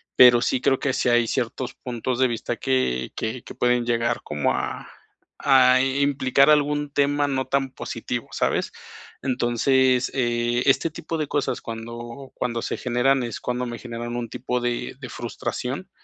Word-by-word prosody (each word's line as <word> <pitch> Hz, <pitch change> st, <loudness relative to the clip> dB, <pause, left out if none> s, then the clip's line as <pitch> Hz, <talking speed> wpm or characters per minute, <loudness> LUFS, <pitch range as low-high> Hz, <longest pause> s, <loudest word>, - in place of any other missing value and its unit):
pero 120 Hz, -1 st, +8 dB
sí 130 Hz, -, +1 dB
creo 135 Hz, 0 st, +3 dB
que 135 Hz, -, 0 dB
sí -, -, 0 dB
hay 120 Hz, 0 st, +4 dB
ciertos 125 Hz, +1 st, -2 dB
puntos 125 Hz, 0 st, -4 dB
de 130 Hz, -, +5 dB
vista 115 Hz, -2 st, -3 dB
que 65 Hz, -1 st, 0 dB
que 115 Hz, +3 st, -3 dB
que -, -, -10 dB
pueden 120 Hz, -1 st, +2 dB
llegar 120 Hz, 0 st, 0 dB
como 75 Hz, -1 st, 0 dB
a -, -, -4 dB, 0.5 s
a, 130 Hz, -2 st, +6 dB
eh, 135 Hz, +1 st, +1 dB
implicar 140 Hz, 0 st, +3 dB
algún 145 Hz, -1 st, +2 dB
tema 145 Hz, 0 st, +2 dB
no 130 Hz, -1 st, -1 dB
tan 135 Hz, -1 st, 0 dB
positivo, -, -, -5 dB
¿sabes? -, -, 0 dB, 0.5 s
Entonces, 130 Hz, +1 st, +2 dB
eh, 120 Hz, -1 st, 0 dB
este 140 Hz, +4 st, +3 dB
tipo 160 Hz, +1 st, -5 dB
de 155 Hz, -2 st, -2 dB
cosas 145 Hz, -, -1 dB
cuando 115 Hz, +3 st, -8 dB
cuando 120 Hz, -2 st, -2 dB
se -, -, -3 dB
generan, 125 Hz, +2 st, +1 dB
es 120 Hz, -2 st, -5 dB
cuando 125 Hz, 0 st, -2 dB
me 120 Hz, -1 st, -6 dB
generan 120 Hz, 0 st, -5 dB
un 120 Hz, -1 st, -3 dB
tipo 125 Hz, +2 st, -2 dB
de 120 Hz, 0 st, -2 dB
de 130 Hz, -3 st, -8 dB
frustración 125 Hz, +7 st, -4 dB
125 Hz, 170 wpm, -24 LUFS, 120-135 Hz, 0.5 s, pero